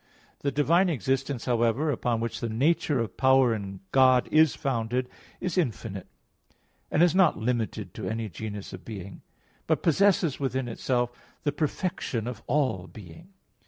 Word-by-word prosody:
The 140 - -1
divine 170 +7 +3
existence, 135 - -1
however, 120 +5 +1
upon 120 -3 -1
which 115 - -3
the 115 - -3
nature 140 +4 +1
of 115 -5 -3
power 130 -2 +5
in 100 -3 -6
God 130 -2 +5
is 155 -2 +5
founded, 125 -1 -1 0.3
is 180 -1 -1
infinite, 110 - -3 0.8
and 155 - +3
is 175 -2 +4
not 185 -3 +4
limited 115 0 -2
to - - -5
any 110 0 -3
genus 105 +2 -7
of 95 - -9
being; 100 -3 -8 0.5
but - - +1
possesses 175 -2 +3
within 130 -2 -1
itself 120 +1 -1 0.3
the 145 - +1
perfection 145 - -2
of 125 -3 -5
all 130 -10 0
being. 110 - -12
125 Hz, 150 wpm, -27 LUFS, 115-150 Hz, 0.8 s, power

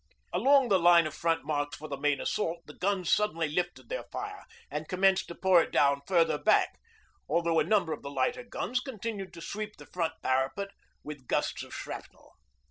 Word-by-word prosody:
Along 275 -1 +5
the 195 -2 +4
line 170 -1 +6
of 155 - -4
front 165 -4 0
marked 145 -1 -1
for 155 - -9
the 145 - -4
main 145 0 +1
assault 170 -4 -2
the 150 - -11
guns 185 -1 -1
suddenly 165 -7 +2
lifted 175 +4 -2
their - - -4
fire 410 0 -6 0.3
and 150 +2 -4
commenced 190 +1 +2
to 170 - -8
pour 185 -2 +5
it - - -4
down 140 0 +3
further 170 -3 +3
back, - - +3 0.5
although 170 -1 +2
a - - +4
number 175 -2 +2
of - - -7
the 140 - -6
lighter 140 - 0
guns 245 +1 -2
continued 220 -7 -5
to 170 - -9
sweep 210 +4 -5
the - - -12
front 165 -3 -2
parapet 135 +10 0 0.3
with 145 -4 -9
gusts - - 0
of - - -10
shrapnel. - - -8
170 Hz, 195 wpm, -30 LUFS, 150-200 Hz, 0.5 s, line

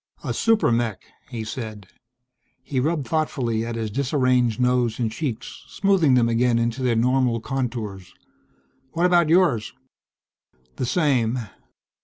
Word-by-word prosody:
"A - - -2
super 225 - +2
mech!" 115 -5 -1 0.3
he 115 -3 -5
said. 110 -2 -6 0.8
He 135 -1 -2
rubbed 150 -1 -1
thoughtfully 125 -7 -1
at 115 0 -4
his 110 -2 -3
disarranged 125 -3 +1
nose 125 -2 +1
and 115 -3 -1
cheeks, 125 -2 -5
smoothing 185 -9 +2
them 120 -2 +3
again 115 +1 +2
into 115 +2 -1
their 125 -2 +1
normal 125 0 +2
contours. 115 -7 -4 0.8
"What 170 +2 +1
about 175 -3 +4
yours?" 165 - +2 1.0
"The 125 - -2
same." 130 -7 +1
125 Hz, 130 wpm, -23 LUFS, 115-140 Hz, 1.0 s, about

